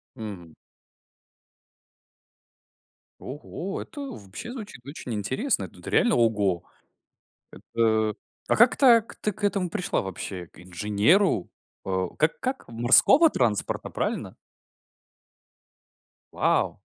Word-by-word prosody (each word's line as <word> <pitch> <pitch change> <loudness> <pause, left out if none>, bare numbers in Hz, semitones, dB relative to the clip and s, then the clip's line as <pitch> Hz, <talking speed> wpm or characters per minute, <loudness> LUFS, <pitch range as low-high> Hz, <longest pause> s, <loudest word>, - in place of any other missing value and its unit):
Мгм. 95 -7 -8 2.6
Ого, 160 +7 -6
это 300 - -10
вообще 110 - -8
звучит 210 - -9
очень 140 -4 -7
интересно. 130 - -1
Тут - - -16
реально 240 -2 +3
ого. 105 -7 +1 0.9
Это, 110 -2 0 0.3
а - - +2
как 235 +2 +6
так, 235 -5 +5
ты 210 - 0
к 205 - -13
этому 195 -3 0
пришла 190 +1 -1
вообще? 95 -2 -6
К - - -20
инженеру? 105 - +1 0.3
Э, 95 -1 -1
как 155 +1 +1
как? 265 +1 -3
Морского 120 - +6
транспорта, 115 - -1
правильно? - - -3 2.0
Вау! - - +1
120 Hz, 100 wpm, -25 LUFS, -, 2.6 s, как